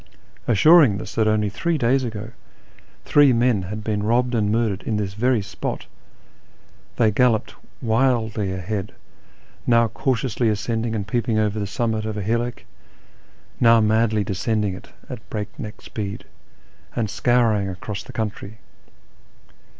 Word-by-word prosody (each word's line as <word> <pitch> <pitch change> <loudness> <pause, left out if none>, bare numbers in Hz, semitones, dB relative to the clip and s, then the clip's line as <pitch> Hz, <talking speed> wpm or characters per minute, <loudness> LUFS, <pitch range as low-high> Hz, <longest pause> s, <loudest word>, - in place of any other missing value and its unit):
Assuring 130 - +6
us 110 -1 -7
that 110 -1 +1
only 110 -1 +2
three 165 - -1
days 130 +1 +2
ago 110 -2 -5 0.7
three 145 -2 +5
men 120 -3 +2
had 105 +4 -6
been 105 -1 -1
robbed 120 +4 +1
and 105 -3 +1
murdered 110 -3 0
in 110 - -2
this 100 -2 -3
very 120 +1 +1
spot, 100 - -5 1.1
they 110 -3 +3
galloped 115 0 +2 0.3
wildly 110 -4 +1
ahead, 95 +2 -4 0.7
now 115 -1 +4
cautiously 120 0 -1
ascending 115 +2 -1
and 100 -2 -3
peeping 115 0 0
over 105 0 0
the 100 - -2
summit 110 +1 -1
of 110 -1 -4
a 105 - -3
hillock, 115 +3 -2 1.0
now 115 -1 +6
madly 110 0 +2
descending 100 +1 -1
it 95 - -11 0.2
at - - -9
break 105 -1 -4
neck 105 - -7
speed, 100 -2 -6 0.7
and 115 -3 0
scouring 110 -3 +2
across 95 +2 -6
the - - -11
country. 110 -1 -5
110 Hz, 140 wpm, -22 LUFS, 105-120 Hz, 1.1 s, Assuring